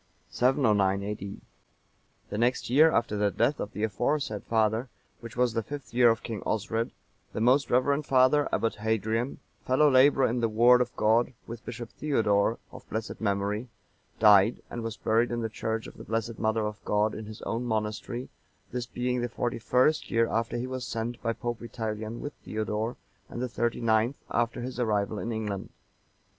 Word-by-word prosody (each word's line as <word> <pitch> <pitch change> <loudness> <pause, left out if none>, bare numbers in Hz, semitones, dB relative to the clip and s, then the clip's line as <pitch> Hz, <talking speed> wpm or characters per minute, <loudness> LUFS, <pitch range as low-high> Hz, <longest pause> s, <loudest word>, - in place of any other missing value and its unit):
[709 105 -7 +2
A.D.] 100 -1 -5 0.9
The - - -2
next 120 0 +1
year 155 +5 +7
after 115 -5 +1
the 105 0 +2
death 120 +8 +1
of 105 - -4
the 105 - -3
aforesaid 115 +1 -1
father,(937) 110 +2 +1 0.3
which 115 -1 -10
was 125 -2 +2
the 115 - 0
fifth 130 0 -8
year 120 0 +6
of 115 0 0
King 110 -5 -5
Osred, 115 +2 -1 0.4
the - - -3
most 130 +5 +3
reverend 140 +4 +2
father, 130 +3 +4
Abbot 115 - 0
Hadrian,(938) 110 +5 -2
fellow 140 +3 +4
labourer 135 +1 +5
in 120 +2 -1
the 115 -1 +1
Word 120 +3 +6
of 125 0 -2
God 115 +4 +2
with 115 0 -8
Bishop 120 -2 -7
Theodore(939) 110 -7 +2
of - - -13
blessed 110 +1 -4
memory, 100 +3 -1 0.5
died, 105 +1 +5
and 120 - -4
was 115 -1 -5
buried 115 +2 +2
in 120 0 -2
the 115 - -2
church 110 0 -3
of - - -11
the - - -9
Blessed 115 0 -3
Mother 110 0 +1
of 105 0 -5
God, 105 +1 +1
in 110 - -6
his 110 0 -9
own 115 +2 -2
monastery,(940) 110 +2 -3 0.4
this 125 -1 -3
being 125 0 -1
the 120 - -2
forty 120 0 -2
first 130 +7 +2
year 115 0 +2
after 115 +1 -1
he 120 - -2
was 130 0 -4
sent 115 0 -4
by 115 -1 0
Pope 120 0 -4
Vitalian 110 -1 -5
with 145 - -5
Theodore, 110 +2 -2 0.3
and - - -6
the 125 - -1
thirty 120 0 -1
ninth 115 +3 +2
after 120 0 0
his 125 0 -5
arrival 105 -3 0
in 115 - -3
England. 105 -3 -3
115 Hz, 180 wpm, -28 LUFS, 110-125 Hz, 0.9 s, year